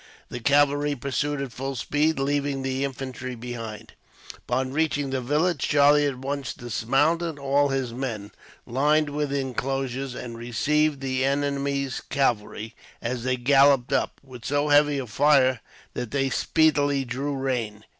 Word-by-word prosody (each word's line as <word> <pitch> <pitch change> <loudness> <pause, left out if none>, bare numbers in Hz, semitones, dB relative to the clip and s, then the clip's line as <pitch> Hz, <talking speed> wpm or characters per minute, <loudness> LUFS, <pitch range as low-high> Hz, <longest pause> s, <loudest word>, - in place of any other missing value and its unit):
The 120 - -5
cavalry 145 +2 +3
pursued 140 +2 -2
at 135 - -6
full 135 +3 -4
speed, 150 +6 +1
leaving 140 0 -1
the 135 0 -1
infantry 130 -1 -5
behind. 115 -2 -7 0.5
Upon 130 +1 -1
reaching 145 -3 0
the 130 -1 -1
village, 150 +5 +1
Charlie 145 0 +5
at 135 -3 -3
once 135 0 -4
dismounted 145 +8 0
all 140 +1 +2
his 135 -3 -2
men, 115 -5 -4 0.3
lined 150 +5 +2
the 145 -1 -1
inclosures, 135 0 -3
and 120 -2 -7
received 145 +5 +1
the 130 -1 -1
enemy's 140 -1 -1
cavalry, 115 -4 -1 0.3
as 120 0 -3
they 130 0 0
galloped 135 0 +4
up, - - 0
with 130 -3 -12
so 145 +1 0
heavy 145 0 +4
a 135 - -3
fire 130 +1 +3 0.3
that 125 -2 -4
they 135 0 0
speedily 145 -3 +2
drew 135 +4 -3
rein. 120 -6 -3
135 Hz, 145 wpm, -25 LUFS, 125-145 Hz, 0.5 s, Charlie